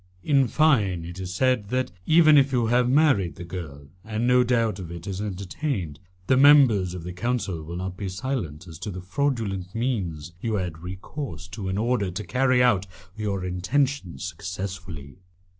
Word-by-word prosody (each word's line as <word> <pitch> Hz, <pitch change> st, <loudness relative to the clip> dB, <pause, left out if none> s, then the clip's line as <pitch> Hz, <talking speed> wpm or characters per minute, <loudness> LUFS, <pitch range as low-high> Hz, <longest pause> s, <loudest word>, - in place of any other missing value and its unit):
In 140 Hz, -3 st, +3 dB
fine, 110 Hz, -, +2 dB
it 85 Hz, +2 st, -8 dB
is 90 Hz, -1 st, -5 dB
said 125 Hz, 0 st, +1 dB
that, 130 Hz, -4 st, -1 dB, 0.2 s
even 155 Hz, -1 st, +7 dB
if 140 Hz, -1 st, +5 dB
you 120 Hz, -3 st, +2 dB
have 120 Hz, +2 st, +3 dB
married 135 Hz, -, +3 dB
the -, -, -8 dB
girl, 80 Hz, -6 st, -7 dB, 0.2 s
and 110 Hz, +1 st, -2 dB
no 125 Hz, 0 st, +5 dB
doubt 115 Hz, -4 st, +1 dB
of 90 Hz, -3 st, -7 dB
it 85 Hz, 0 st, -8 dB
is 95 Hz, 0 st, -4 dB
entertained, 100 Hz, -, -3 dB, 0.3 s
the 130 Hz, -, +3 dB
members 130 Hz, -11 st, +6 dB
of 90 Hz, -, -7 dB
the 90 Hz, +1 st, -6 dB
Council 105 Hz, -4 st, -2 dB
will 85 Hz, +2 st, -7 dB
not 90 Hz, +1 st, -4 dB
be 100 Hz, -2 st, -4 dB
silent 95 Hz, -, -4 dB
as 80 Hz, -2 st, -10 dB
to 105 Hz, -, -5 dB
the 90 Hz, -2 st, -6 dB
fraudulent 100 Hz, -4 st, -2 dB
means 90 Hz, -, -2 dB
you 110 Hz, -2 st, -1 dB
have 95 Hz, -, 0 dB
had 80 Hz, -, -14 dB
recourse 95 Hz, -, -7 dB
to 95 Hz, 0 st, -5 dB
in 95 Hz, -, -1 dB
order 110 Hz, -3 st, +1 dB
to 95 Hz, +4 st, -5 dB
carry 125 Hz, +4 st, +2 dB
out 100 Hz, -6 st, +3 dB, 0.3 s
your 100 Hz, -3 st, -2 dB
intentions 95 Hz, -, -1 dB
successfully." 90 Hz, -5 st, -6 dB
100 Hz, 180 wpm, -25 LUFS, 90-125 Hz, 0.3 s, even